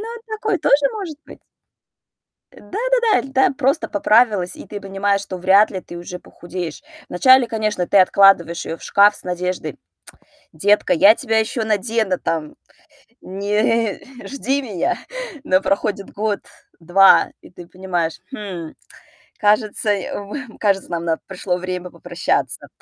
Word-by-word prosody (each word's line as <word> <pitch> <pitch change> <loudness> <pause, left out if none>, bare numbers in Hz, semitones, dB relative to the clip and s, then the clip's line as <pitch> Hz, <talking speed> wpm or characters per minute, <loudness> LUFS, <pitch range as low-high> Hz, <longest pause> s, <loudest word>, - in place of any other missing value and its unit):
Ну, 440 - -6 0.2
такое 435 -3 -2
тоже 285 -2 +3
может 370 -9 -6
быть. - - -14 1.1
Да-да-да. 475 - 0
Да, - - -9
иль 270 - -13
да 265 0 +3
просто 280 +3 0
поправилась, 210 -3 +2
и - - -11
ты 205 - -7
понимаешь, 200 0 -1
что 185 -2 -7
вряд 195 +4 +4
ли 190 - -5
ты 175 - -11
уже 175 +1 -7
похудеешь. 175 - -8 0.3
Вначале, 260 +7 +5
конечно, 215 -5 -1
ты 200 - +3
откладываешь 185 -3 +4
её 165 - -5
в - - -19
шкаф 205 +1 +4
с - - -7
надеждой: 180 -4 -3 0.8
"Детка, 205 +6 +2
я 200 +6 +6
тебя 225 -1 -1
ещё 220 +1 -2
надену, 215 -2 0
там, 160 -2 -3 0.7
не 210 +3 -1 0.3
жди 275 0 -2
меня". 200 -9 -2 0.5
Но 185 0 +3
проходит 200 0 -2
год, 210 -1 -2 0.4
2, 185 +4 +5
и - - -16
ты 175 -1 -12
понимаешь: 175 -3 -3
"Хм, 185 -8 -7 0.6
кажется, 210 +1 +1
м, 205 +5 -6
кажется, 195 -3 0
нам 170 -1 -3
на 165 -1 0
пришло 185 -1 -3
время 180 0 -5
попрощаться". - - -3
200 Hz, 140 wpm, -20 LUFS, 180-225 Hz, 1.1 s, я